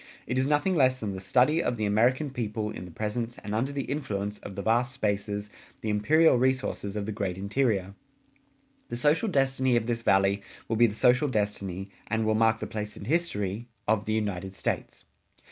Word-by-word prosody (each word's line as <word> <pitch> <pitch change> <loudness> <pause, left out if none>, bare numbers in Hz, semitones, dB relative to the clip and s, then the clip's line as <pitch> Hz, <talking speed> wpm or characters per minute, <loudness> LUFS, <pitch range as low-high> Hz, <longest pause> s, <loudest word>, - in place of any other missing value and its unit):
It 125 +2 -1
is 130 - +1
nothing 150 +6 +2
less 130 -4 +3
than 105 -2 -3
the 95 - -5
study 130 - +3
of 120 -5 -1
the 110 - 0
American 125 +8 +2
people 110 -4 -3
in 90 - -7
the 90 - -10
presence 115 +5 -3
and 105 - -6
under 125 +6 0
the 140 -1 -2
influence 105 -8 -3
of 100 - -9
the 100 - -4
vast 120 +3 +2
spaces, 105 -3 -2 0.3
the 110 - -2
imperial 150 +9 +4
resources 130 -5 0
of 105 -1 -2
the 110 - -3
great 100 -3 -3
interior. 100 -2 0 1.0
The 120 - -3
social 150 - +2
destiny 135 -5 +2
of 115 -2 +1
this 115 -1 -1
Valley 95 -1 +3 0.3
will 115 - 0
be 120 +2 +6
the 105 - -5
social 130 +6 +4
destiny, 100 -5 -2 0.2
and 110 0 0
will 110 - +2
mark 110 0 +3
the - - -3
place 105 -1 -5
in 100 - -8
history, 115 - -1 0.2
of 110 0 +2
the 110 - -1
United 95 -3 -2
States. - - -3
110 Hz, 195 wpm, -28 LUFS, 100-130 Hz, 1.0 s, be